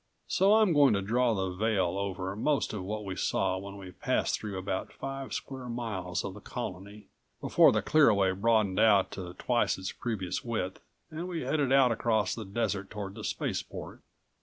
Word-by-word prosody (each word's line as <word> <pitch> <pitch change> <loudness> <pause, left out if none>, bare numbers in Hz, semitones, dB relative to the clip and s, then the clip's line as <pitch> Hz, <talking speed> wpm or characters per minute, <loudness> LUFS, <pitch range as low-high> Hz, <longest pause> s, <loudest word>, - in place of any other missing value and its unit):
So 200 +3 +4
I'm 215 -5 +4
going 145 -6 +5
to 100 - 0
draw 120 +3 +2
the 95 -2 -1
veil 95 -2 0
over 95 -1 -3
most 140 +5 0
of 105 - -3
what 105 +2 -4
we 95 -1 -4
saw 95 0 0
when 100 +1 -8
we 95 -2 -9
passed - - 0
through 105 -3 -5
about 95 0 -3
five 135 0 -6
square 130 -2 -5
miles 100 -7 -3
of 100 - -4
the 105 - -10
Colony, 105 -3 -7 0.3
before - - +5
the - - 0
clear 155 -4 +5
away 100 -3 +3
broadened 105 -1 +2
out 105 -4 +5
to 90 -2 -7
twice 120 +3 +1
its 95 +1 -4
previous 100 -7 -3
width 110 -6 -3 0.3
and 165 +3 -5
we 170 -3 -3
headed 145 -4 0
out 135 -2 +5
across 110 -3 +1
the 110 - -6
desert 100 -1 -2
toward 100 -2 -6
the - - -9
spaceport. - - -4
105 Hz, 185 wpm, -30 LUFS, 95-125 Hz, 0.3 s, going